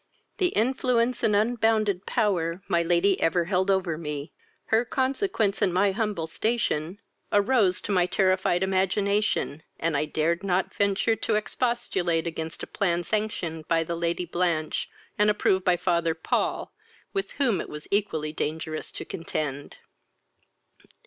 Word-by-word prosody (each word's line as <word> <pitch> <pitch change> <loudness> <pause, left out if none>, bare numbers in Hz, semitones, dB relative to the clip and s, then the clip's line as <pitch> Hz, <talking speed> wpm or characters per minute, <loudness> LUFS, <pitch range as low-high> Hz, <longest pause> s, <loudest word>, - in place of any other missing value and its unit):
The 370 - +4
influence 250 -1 +1
and 210 - +3
unbounded 215 -3 +1
power 185 -6 0
my 170 - +2
lady 175 +3 +2
ever 170 +1 +2
held 190 +1 +1
over 185 -5 +1
me, 150 -2 -5 0.4
her 225 +2 +5
consequence, 260 - 0
and 200 -3 +3
my 195 +3 +3
humble 205 -5 -1
station, 185 -3 -1 0.3
arose 205 -3 +3
to - - -4
my 180 -2 +3
terrified 185 -1 +2
imagination, 195 -3 +1 0.2
and 165 -1 0
I 145 +2 +1
dared 165 +3 0
not 190 -1 0
venture 200 +2 +2
to 220 - 0
expostulate 205 -7 0
against 160 -1 -5
a - - -2
plan 175 -3 0
sanctioned 170 -6 -2
by 165 0 +2
the 170 +1 -3
Lady 170 +1 -1
Blanch, 170 -3 -1 0.3
and 210 0 +5
approved 190 -2 +2
by 180 -1 +4
father 170 -2 +1
Paul, 160 - -1 0.4
with 390 -1 -2
whom 235 -11 +1
it - - -8
was 150 0 -8
equally 160 -7 0
dangerous 155 +1 -3
to - - -6
contend. 150 -4 -4
185 Hz, 140 wpm, -26 LUFS, 165-210 Hz, 0.4 s, her